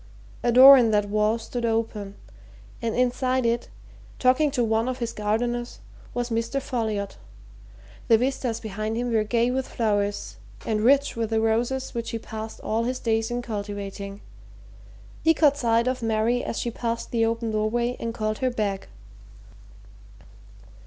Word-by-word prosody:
A 240 - +2
door 265 +3 +10
in 235 -2 +3
that 205 -1 +1
wall 215 +2 +2
stood 235 +1 -5
open, 225 -3 -2 0.7
and 230 -1 -2
inside 255 0 +1
it, 235 +1 0 0.5
talking 255 +4 +3
to 265 -3 0
one 225 +2 +1
of 255 - -3
his 235 -2 -3
gardeners, 240 +3 -2 0.4
was 245 0 -2
Mr. 230 +4 -1
Folliot 220 - -3 0.9
the 225 - +6
vistas 250 -2 -1
behind 215 +1 -4
him 245 0 -1
were 220 -1 +3
gay 235 +3 +1
with 265 0 -2
flowers 205 - -1 0.3
and 215 -1 0
rich 275 +5 +3
with 225 -2 -2
the 225 -1 +1
roses 235 +4 0
which 235 -2 -3
he 230 - -3
passed 220 -1 -7
all 225 +2 -1
his 255 +1 -1
days 225 -2 0
in 240 0 -3
cultivating. 200 -2 -6 1.0
He 325 0 +4
caught 290 -3 +4
sight 235 -2 +2
of 255 0 -1
Mary 225 +2 +1
as - - -4
she 235 - -2
passed 230 0 -3
the 230 -1 +1
open 230 0 -1
doorway 235 +3 0
and 230 - -3
called 215 -2 -2
her 260 - +1
back. 205 -5 -2
230 Hz, 160 wpm, -25 LUFS, 215-245 Hz, 1.0 s, door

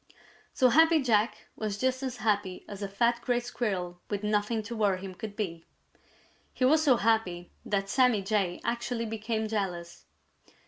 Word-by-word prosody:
So 255 -2 +4
Happy 320 +5 +5
Jack 220 -5 +1
was 210 -2 -3
just 260 +2 0
as 260 -2 -4
happy 205 -5 -1
as 205 0 -8
a 200 - -2
fat 235 +4 +1
Gray 240 0 +1
Squirrel 195 -8 -3
with 205 0 -3
nothing 210 +1 0
to 230 +3 -6
worry 200 -4 +1
him 190 0 -7
could 205 +2 -7
be. 170 -6 -4 0.9
He 255 - +2
was 310 +4 +5
so 265 -5 +5
happy 200 -6 0
that 195 -1 -1
Sammy 250 -3 +3
Jay 195 -3 0
actually 235 0 -2
became 220 0 -2
jealous. 180 -5 -4
215 Hz, 165 wpm, -29 LUFS, 195-240 Hz, 0.9 s, Happy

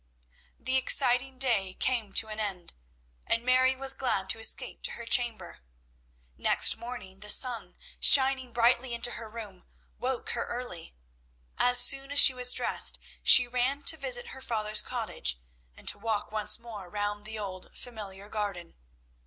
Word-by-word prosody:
The 260 +2 -1
exciting 260 0 +2
day 220 -8 0
came 235 -6 -2
to 220 - +2
an 215 0 -7
end, 195 -5 -6 0.5
and 230 +1 -1
Mary 255 +1 +2
was 270 0 -3
glad 245 -8 -3
to 225 - -5
escape 225 - -1
to - - -6
her 235 - -9
chamber. 230 - 0 0.8
Next - - +3
morning, 235 -6 -10
the 210 +1 -8
sun 245 +1 +1 0.2
shining 265 -2 +5
brightly 240 +1 +1
into 240 +1 -1
her 225 -2 -8
room 210 -5 -10 0.4
woke 255 -1 -4
her 235 - -4
early. 235 - -8 0.6
As 245 0 +4
soon 275 0 +4
as 285 - -3
she 265 - +9
was 250 0 +3
dressed - - +1 0.2
she 250 -1 +6
ran 250 +4 -2
to 320 - +3
visit 260 -5 -4
her 265 - -12
father's 215 -4 0
cottage, 215 - -4 0.4
and - - -17
to - - -5
walk 220 -1 -4
once 210 -1 +2
more 220 -6 -11
round 205 +1 -4
the 220 +1 -7
old 190 -3 -7
familiar 205 -4 -8
garden. 200 -5 -6
235 Hz, 160 wpm, -27 LUFS, 205-255 Hz, 0.8 s, she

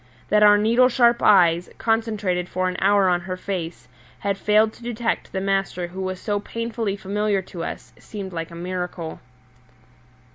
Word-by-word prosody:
That 210 0 +4
our 205 0 +7
needle 235 +4 +4
sharp 240 -1 +3
eyes, 175 -4 +4
concentrated 215 -6 -1
for 185 0 -1
an 185 - -2
hour 200 0 +4
on 175 -1 +2
her 185 +1 -5
face, 175 -6 -5 0.3
had 200 0 -1
failed 215 +2 +2
to - - -18
detect 235 -1 -3
the 190 - -2
master 195 -2 -1
who 190 +2 -7
was 185 -1 -3
so 205 0 -1
painfully 230 -1 -3
familiar 200 0 -1
to 175 -2 -7
us - - -7
seemed 195 -4 -8
like 165 -1 -4
a 170 - -11
miracle. 180 -1 -5
195 Hz, 170 wpm, -23 LUFS, 180-215 Hz, 0.3 s, our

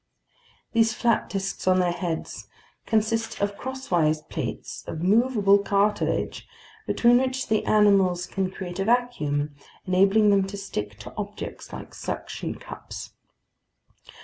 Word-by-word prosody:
These 225 -1 +3
flat 235 -2 +1
disks 195 -1 -3
on 185 0 +5
their 180 -1 +2
heads 170 -2 -4 0.4
consist 225 +1 0
of 200 0 0
crosswise 175 -13 0
plates - - -5
of 160 - -4
movable 205 -1 +4
cartilage, 200 +1 0 0.4
between 240 +1 +5
which 260 -1 -2
the 215 -1 +2
animals 195 -4 +4
can 190 0 -2
create 185 -1 -7
a 195 - 0
vacuum, 155 -12 +1 0.3
enabling 195 +3 +4
them 195 -1 +3
to 200 +1 -6
stick 105 - -5
to 125 +3 -9
objects 205 0 -6
like - - -8
suction - - -5
cups. - - -9
200 Hz, 125 wpm, -25 LUFS, 180-225 Hz, 0.4 s, on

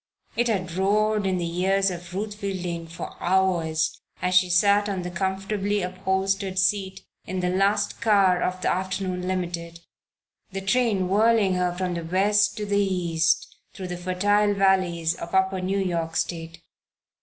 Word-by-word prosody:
It 240 +1 +1
had 185 -6 -1
roared 205 +2 +1
in 185 -1 0
the 170 -1 -3
ears 195 +1 +2
of 175 -1 -8
Ruth 210 +2 -3
Fielding 180 -5 -4
for 165 - -8
hours 170 -4 +1 0.2
as 180 +1 -1
she 185 0 +4
sat 200 +3 +3
on 190 -3 -3
the 180 - -5
comfortably 195 +2 -1
upholstered 190 +1 -1
seat 190 +1 0 0.3
in 185 0 -3
the 180 0 0
last 195 +3 +1
car 195 -5 +4
of 185 0 -1
the - - +2
afternoon 185 0 -2
Limited, 170 -2 -4 0.7
the 195 0 -4
train 200 -2 +1
whirling 210 0 +3
her 180 -1 +1
from 180 0 -3
the 170 -1 -4
West 205 +4 +2
to 210 - -3
the 200 0 +1
East, 170 -4 0 0.2
through 185 -1 -6
the 175 - -3
fertile 205 +4 +1
valleys 185 -4 +2
of 170 +2 -6
Upper 190 0 +2
New 190 +2 -1
York 170 -4 -2
State. 165 0 -3
190 Hz, 160 wpm, -25 LUFS, 180-200 Hz, 0.7 s, she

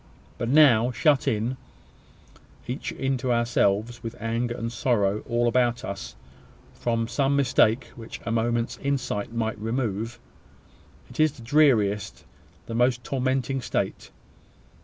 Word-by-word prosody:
But 120 - -2
now, 125 -5 +6
shut 140 +2 +2
in, 120 +1 0 1.1
each 125 +2 -4
into 130 -2 -1
ourselves, 120 -1 +1
with 115 - -7
anger 115 +2 -2
and 115 0 -4
sorrow 105 -5 0
all 120 0 +2
about 120 0 +1
us, 100 0 -6 0.6
from 115 -1 -1
some 135 +3 +1
mistake 130 -3 +2
which 115 -1 -9
a 115 - -2
moment's 115 +1 0
insight 130 -7 -2
might 110 -2 -2
remove 115 0 -2 0.9
it - - -13
is 155 -2 +4
the 125 -6 -13
dreariest, 115 -7 +2 0.4
the - - -6
most 120 +1 +2
tormenting 130 0 -1
state! - - -3
120 Hz, 125 wpm, -25 LUFS, 115-130 Hz, 1.1 s, now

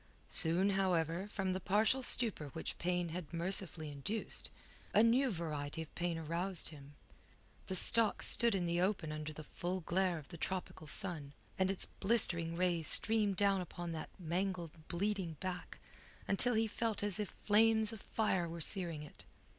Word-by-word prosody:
Soon, 180 +5 +5
however, 180 -1 0
from 195 -3 -2
the 185 - -3
partial 215 +7 +2
stupor 230 - +2
which 160 - -6
pain 175 0 -1
had 165 -1 -7
mercifully 170 -2 -1
induced, 145 +11 -5 0.5
a 215 - +6
new 250 +4 +3
variety 160 -4 -4
of 160 - -17
pain 175 -1 -2
aroused 170 +3 -1
him. 145 -2 -14 0.7
The 190 - -3
stocks 225 +4 +6
stood 235 -3 +5
in 180 -2 -1
the 170 +1 0
open 185 -5 -1
under 155 0 -5
the 155 0 -9
full 180 +4 -4
glare 180 +1 0
of 150 - -11
the 170 - -9
tropical 180 -4 -4
sun, 150 -4 -2 0.3
and 190 0 +2
its 195 - 0
blistering 175 -6 +1
rays 175 -2 0
streamed 215 -3 +4
down 200 -2 +2
upon 175 -1 -6
that 160 -1 -6
mangled, 175 -1 -3 0.2
bleeding 190 -1 -2
back 185 -1 -6 0.5
until 235 +5 +1
he 225 +1 +2
felt 220 -1 -3
as 205 0 -1
if 210 - -5
flames 220 +1 +3
of 220 - -10
fire 190 -6 -1
were 170 +1 -7
searing 170 -3 -2
it. 150 - -13
180 Hz, 165 wpm, -35 LUFS, 165-205 Hz, 0.7 s, a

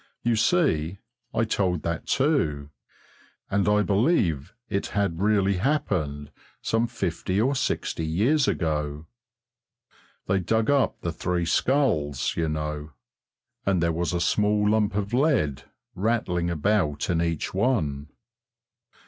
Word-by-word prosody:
You 120 -1 +2
see, 110 - +1 0.3
I 110 - +1
told 95 -6 0
that 85 0 -3
too, 80 - +1 0.8
and 100 0 +2
I 105 0 +3
believe 100 - +1 0.2
it 100 -2 -2
had 100 -4 -1
really 100 -2 +2
happened 90 - -1 0.3
some 115 +1 0
fifty 95 -3 -2
or 130 +6 +2
sixty 135 -10 -2
years 115 - +2
ago. 75 -2 -1 1.2
They 95 0 +1
dug 110 +6 +1
up 140 -2 +1
the 85 - -2
three 85 +1 -1
skulls, 80 - +1
you 80 -1 0
know, 75 -1 -4 0.7
and 95 -2 +1
there 85 0 +1
was 85 +2 -1
a 90 - -1
small 105 +3 +2
lump 105 -2 +1
of 100 +1 -2
lead 125 - +1 0.3
rattling 95 -5 0
about 85 -2 0
in 85 -2 +1
each 85 -2 -2
one. 80 - 0
95 Hz, 125 wpm, -25 LUFS, 80-110 Hz, 1.2 s, I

